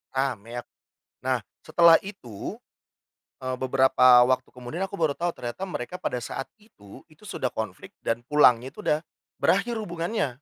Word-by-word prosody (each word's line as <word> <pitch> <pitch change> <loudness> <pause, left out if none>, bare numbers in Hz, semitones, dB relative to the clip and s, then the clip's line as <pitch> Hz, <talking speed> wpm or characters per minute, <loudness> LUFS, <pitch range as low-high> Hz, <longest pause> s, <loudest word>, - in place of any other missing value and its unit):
rame 125 -5 -1
yap. 120 - -5 0.5
Nah - - -1 0.2
setelah 170 -1 +7
itu, 125 - -8 0.8
eee, 130 0 -3
beberapa 130 -1 +6
waktu 130 0 +1
kemudian 125 +7 -7
aku 200 - -7
baru 160 -5 +2
tahu 175 +4 -2
ternyata 120 +10 -6
mereka 180 +3 -5
pada - - -2
saat 135 - -5
itu, 210 - -16
itu 195 +7 -15
sudah 130 - -2
konflik 105 -5 -6
dan 115 +1 -2
pulangnya 130 -3 +4
itu - - -11
udah 155 +2 0 0.3
berakhir 225 +5 +2
hubungannya. 175 -3 -2
130 Hz, 150 wpm, -26 LUFS, 120-170 Hz, 0.8 s, setelah